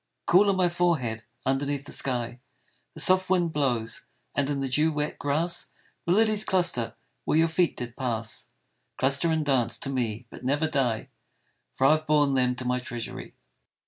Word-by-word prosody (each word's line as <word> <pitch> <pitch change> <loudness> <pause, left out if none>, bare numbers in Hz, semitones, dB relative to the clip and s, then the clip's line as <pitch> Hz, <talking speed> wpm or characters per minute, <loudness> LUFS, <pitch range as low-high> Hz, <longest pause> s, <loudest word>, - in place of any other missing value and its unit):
Cool 195 +4 +5
on 195 - +3
my 185 -1 +3
forehead 155 -11 0 0.2
underneath 140 +1 0
the - - -9
sky 120 -2 -2 0.6
The - - -6
soft 185 0 +4
wind 175 -3 +2
blows, 120 -6 -1 0.3
and 140 -1 +1
in 145 -1 -1
the 135 - -1
dew 150 +5 +2
wet 150 0 -3
grass 165 +5 -1 0.4
The - - +2
lilies 215 0 +3
cluster 175 - +1 0.3
where - - +1
your 165 +1 +5
feet 165 +1 +1
did 120 -1 -6
pass, 115 -4 -3 0.5
Cluster 140 +5 +1
and 160 -1 0
dance 125 -5 +1
to 135 - -4
me 120 -3 -2
but - - -11
never 145 +5 +1
die, 130 -7 -1 0.7
For 135 - +2
I 135 - +7
have 155 0 +1
borne 145 -2 +3
them 125 -1 +2
to 125 0 -5
my 125 0 +1
treasury. 120 -2 -6
140 Hz, 175 wpm, -27 LUFS, 125-165 Hz, 0.7 s, I